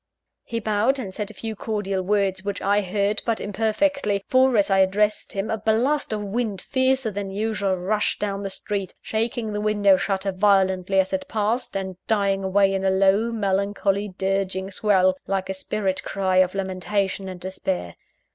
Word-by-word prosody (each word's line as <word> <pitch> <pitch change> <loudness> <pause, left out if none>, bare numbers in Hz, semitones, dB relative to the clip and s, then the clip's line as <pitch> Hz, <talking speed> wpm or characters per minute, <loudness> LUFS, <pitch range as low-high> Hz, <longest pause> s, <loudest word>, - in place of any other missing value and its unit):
He 230 - -4
bowed 220 +5 +1
and 200 -8 -5
said 210 0 -4
a - - -11
few 220 +2 -5
cordial 200 -3 -2
words, 195 -1 0
which 200 -1 -3
I 205 +1 +2
heard 200 +2 0
but 230 -2 -1
imperfectly 215 +1 0
for, 260 -2 +4
as 200 -1 +2
I 195 - +4
addressed 205 +3 +1
him, 195 +1 -2
a 220 - -1
blast 240 +8 +1
of 210 -1 -2
wind 205 -1 -2
fiercer 260 +1 +1
than 200 -1 -4
usual, 205 -1 -1
rushed 205 +4 -1
down 200 -1 -2
the 200 - -3
street, 195 0 -3
shaking 225 0 -2
the 210 - -2
window 205 -2 +4
shutter 195 0 -1
violently 190 -1 +2
as 190 0 +1
it 285 0 -2
passed, 225 -1 -1
and 190 -2 -5
dying 200 -3 +1
away 195 +1 +3
in 195 0 -1
a 190 - +3
low, 195 +4 +3
melancholy, 200 -1 0
dirging 190 0 -1
swell, 185 -2 +3
like 190 -1 -1
a - - 0
spirit 190 0 -2
cry 190 -1 0
of 185 0 +3
lamentation 190 0 -2
and 185 -1 -7
despair. 185 - -3
200 Hz, 175 wpm, -24 LUFS, 190-215 Hz, -, for